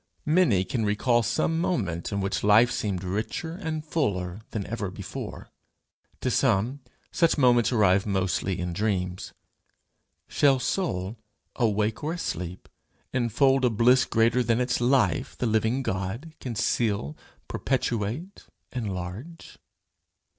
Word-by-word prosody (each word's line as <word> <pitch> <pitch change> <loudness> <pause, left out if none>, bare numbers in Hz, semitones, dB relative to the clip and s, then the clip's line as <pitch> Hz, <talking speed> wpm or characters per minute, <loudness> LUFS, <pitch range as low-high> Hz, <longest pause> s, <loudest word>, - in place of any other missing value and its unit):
Many 150 - +3
can 115 +1 -2
recall 115 +4 +2
some 160 +8 0
moment 95 - -1
in 100 -1 -1
which 95 0 -2
life 110 +4 +6
seemed 95 -4 -2
richer 110 - -3
and 160 -4 -4
fuller 100 - -1
than 105 -3 -4
ever 105 -1 -3
before; 95 - -7 0.7
to - - 0
some, 115 +9 +1 0.3
such 165 -2 +2
moments 125 -4 +4
arrive 100 -4 +3
mostly 95 -1 0
in 90 -1 -3
dreams: 95 -2 -2 1.0
shall 140 -2 +3
soul, 115 - -2 0.4
awake 110 -1 0
or 155 +2 -1
asleep, 90 - -5 0.5
infold 130 +2 +2
a 125 - +5
bliss 125 +3 +4
greater 115 +2 +2
than 115 -1 +1
its 125 -1 0
Life, 130 +2 +2
the - - -1
living 110 +4 +1
God, 100 - -3
can 125 -3 -5
seal, 105 - 0 0.3
perpetuate, 130 - -2 0.3
enlarge? 105 - -6
115 Hz, 125 wpm, -26 LUFS, 100-130 Hz, 1.0 s, life